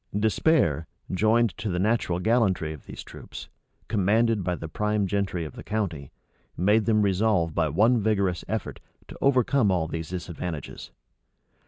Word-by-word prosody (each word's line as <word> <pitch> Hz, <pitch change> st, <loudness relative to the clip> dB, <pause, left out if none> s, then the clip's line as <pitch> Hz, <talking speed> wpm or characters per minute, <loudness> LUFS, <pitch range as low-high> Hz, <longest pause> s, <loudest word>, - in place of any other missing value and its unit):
Despair, 105 Hz, -, +2 dB, 0.2 s
joined 110 Hz, +2 st, +2 dB
to 105 Hz, -1 st, -2 dB
the 90 Hz, -, -1 dB
natural 100 Hz, -2 st, +1 dB
gallantry 95 Hz, -7 st, +1 dB
of 75 Hz, -, -13 dB
these -, -, -8 dB
troops, -, -, -10 dB, 0.4 s
commanded 110 Hz, +1 st, +2 dB
by 90 Hz, 0 st, -1 dB
the 80 Hz, -, -7 dB
prime 105 Hz, +4 st, 0 dB
gentry 95 Hz, -3 st, -1 dB
of 75 Hz, -, -8 dB
the -, -, -9 dB
county, 85 Hz, -11 st, -3 dB, 0.5 s
made 105 Hz, +4 st, +3 dB
them 105 Hz, -1 st, +3 dB
resolve 95 Hz, -4 st, +1 dB
by 80 Hz, -1 st, +1 dB
one 110 Hz, -, +3 dB
vigorous 100 Hz, -5 st, 0 dB
effort, -, -, -4 dB, 0.3 s
to -, -, -10 dB
overcome 130 Hz, -3 st, +3 dB
all 90 Hz, -4 st, +1 dB
these 80 Hz, -1 st, -5 dB
disadvantages. 85 Hz, -6 st, -6 dB
100 Hz, 150 wpm, -26 LUFS, 85-110 Hz, 0.5 s, made